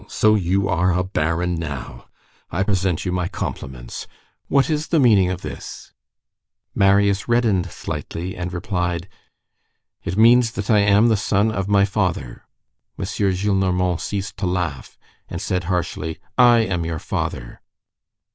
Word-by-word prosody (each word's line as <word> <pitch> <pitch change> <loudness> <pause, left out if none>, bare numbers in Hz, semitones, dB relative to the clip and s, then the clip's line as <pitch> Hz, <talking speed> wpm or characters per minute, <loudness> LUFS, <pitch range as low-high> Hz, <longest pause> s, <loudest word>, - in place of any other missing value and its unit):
so 110 0 +3
you 95 -1 +1
are 90 -1 +2
a 90 - +1
baron 90 -1 -1
now. 70 -7 -6 0.4
I 95 +3 0
present 95 -4 0
you 90 - -1
my 90 -1 -1
compliments. 65 -7 -6 0.4
What 140 -1 +3
is 155 -1 -1
the 165 - +2
meaning 105 -8 +5
of 90 0 -4
this?" - - -8 0.8
Marius 100 0 +3
reddened 115 -6 +2
slightly 90 +3 -5
and 90 -1 -4
replied:— 90 -2 -2 1.0
"It 90 - -3
means 115 +1 +5
that 100 +3 -2
I 105 - +5
am 100 +3 +4
the 110 - +3
son 105 +2 +1
of 95 -2 -2
my 100 -1 +4
father." 90 - -2 0.5
M. - - -3
Gillenormand 95 -2 0
ceased 100 -1 -4
to 95 - -1
laugh, 90 -7 -3 0.3
and - - -5
said 90 -2 -2
harshly:— 85 -2 -2 0.2
"I 120 -2 +6
am 90 -6 -1
your 80 -1 -3
father." 60 -4 -4
95 Hz, 145 wpm, -21 LUFS, 90-105 Hz, 1.0 s, I